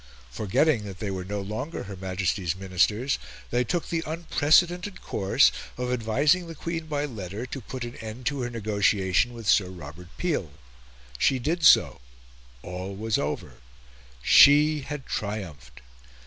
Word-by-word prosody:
Forgetting 110 - +1
that 95 -2 -8
they 100 +1 -4
were 95 -1 -4
no 100 +2 -4
longer 110 +11 -5
her 100 0 -8
Majesty's 95 -1 -2
Ministers, 95 +7 0 0.3
they 125 - +2
took 170 +7 -2
the 165 -1 -1
unprecedented 170 +4 +2
course 95 -1 +3 0.3
of 125 0 -2
advising 145 +10 +2
the 165 - -8
Queen 165 +1 -4
by 145 -1 -1
letter 105 -3 -6
to 130 +2 -7
put 125 +2 -6
an 120 0 -7
end 110 +3 -8
to 140 +1 -1
her 120 - -2
negotiation 105 -2 +1
with 115 -3 -9
Sir 95 -4 +4
Robert 85 -1 -10
Peel. 145 - -2 0.7
She 135 - +3
did 160 +7 -2
so; 60 - +6 0.6
all 90 +2 -6
was 110 +2 -1
over; 75 +1 -4 0.7
she 150 - +7
had 140 0 -6
triumphed. 80 - -5
110 Hz, 150 wpm, -26 LUFS, 95-145 Hz, 0.7 s, she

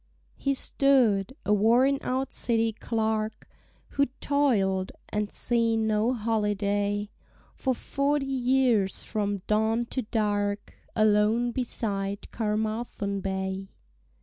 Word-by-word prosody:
HE 275 0 0
stood, 255 -6 +2
a 210 - +3
worn 240 +7 +4
out 260 +1 -2
City 225 -1 +1
clerk— 220 -1 -2 0.4
Who'd 280 -3 +1
toil'd, 200 -10 +1 0.2
and 210 -1 -1
seen 230 -2 +1
no 215 +2 +2
holiday, 205 -2 0 0.4
For 260 -2 -1
forty 280 +3 0
years 250 -6 +2
from 205 -3 -2
dawn 220 +2 +1
to 260 - -1
dark— 205 -2 -1 0.2
Alone 215 +2 +3
beside 205 -5 -2
Caermarthen 215 -2 -2
Bay. 190 0 -3
220 Hz, 100 wpm, -27 LUFS, 205-245 Hz, 0.4 s, worn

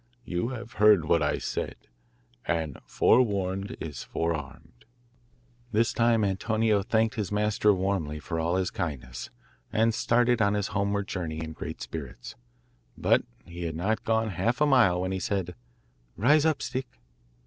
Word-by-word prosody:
You 90 +5 -1
have 120 -2 -7
heard 105 -6 +6
what - - +3
I - - +1
said, - - -3 0.7
and 80 -5 -2
forewarned 100 -2 +2
is 80 -3 -6
forearmed.' 80 -4 -4 0.9
This 115 +2 +2
time 115 -2 +3
Antonio 105 +2 +1
thanked 110 +2 +1
his 105 -6 -3
master 105 0 +2
warmly 95 -6 -1
for 80 +2 -4
all 85 +2 0
his 95 -1 0
kindness, 65 - -5 0.4
and 110 +1 +2
started 120 +1 +2
on 100 0 +3
his 100 -2 -1
homeward 100 0 -1
journey 85 -6 -4
in 80 0 -5
great - - -6
spirits; - - -7 0.6
but - - +3 0.2
he 85 0 -7
had 80 -2 -3
not 110 +7 -1
gone 110 0 +1
half 120 - 0
a 150 - +4
mile 115 -11 +4
when 95 0 -2
he 95 - -2
said 95 -2 -2 0.6
'Rise 145 +7 +4
up, 155 - 0
Stick. 130 +1 -3
100 Hz, 150 wpm, -27 LUFS, 85-115 Hz, 0.9 s, heard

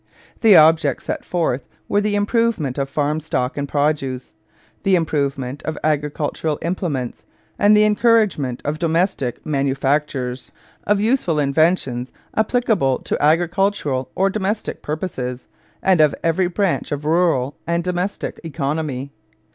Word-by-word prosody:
The 220 -4 +6
objects 155 -3 +4
set - - -3
forth 155 -8 -1 0.2
were 205 - +2
the 205 0 0
improvement 205 - 0
of 135 0 -1
farm 150 +2 0
stock 135 -4 -2
and 140 -1 -3
produce, 140 -3 -1 0.5
the 195 -1 +3
improvement 140 -5 -1
of 155 -1 -4
agricultural 150 0 -1
implements, 165 -8 -3 0.3
and 210 +1 +6
the 210 - +6
encouragement 210 - +2
of 150 +2 -2
domestic 165 - 0
manufactures, 135 -2 -1 0.3
of 205 -1 +2
useful 215 - +1
inventions 140 -4 +1 0.2
applicable 220 - +2
to - - -3
agricultural 165 -4 +1
or 195 +1 +2
domestic 210 +1 -2
purposes, 135 -6 -4 0.4
and 185 -4 +4
of 150 -2 +4
every 165 +2 +2
branch 190 -1 -1
of 145 0 -3
rural 155 -5 +2
and 170 0 0
domestic 180 +2 -3
economy. 145 -3 -3
155 Hz, 125 wpm, -20 LUFS, 140-185 Hz, 0.5 s, The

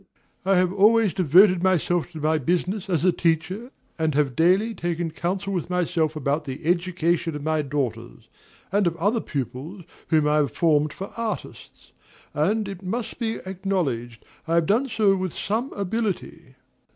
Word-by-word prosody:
I 195 0 +4
have 180 0 +2
always 210 0 +4
devoted 180 +2 +5
myself 175 -2 +1
to - - -7
my 155 +1 +1
business 180 +7 -1
as 170 -2 +1
a 185 - +6
teacher, 175 +8 -1 0.3
and 160 -3 0
have 140 -4 +1
daily 190 +7 +3
taken 175 -3 -3
counsel 185 +4 -3
with 175 -2 -3
myself 170 -3 0
about 150 +1 -1
the 140 +3 -7
education 170 -1 0
of 150 - -6
my 155 0 +1
daughters, 120 -5 -4 0.4
and 200 -1 +2
of 170 - 0
other 205 +7 +1
pupils 145 - -5 0.2
whom 155 -2 +3
I 150 0 +3
have 145 -3 +1
formed 150 -3 +2
for 195 - -7
artists; 230 -2 -6 0.4
and, 200 +8 +1
it 195 -2 -7
must 220 +7 -4
be 225 -2 -1
acknowledged, 175 - -3 0.2
I 165 - +1
have 170 -1 +3
done 240 - +1
so 210 -4 +3
with 185 -3 -3
some 230 +7 -2
ability. 200 - -3
175 Hz, 165 wpm, -24 LUFS, 155-195 Hz, 0.4 s, a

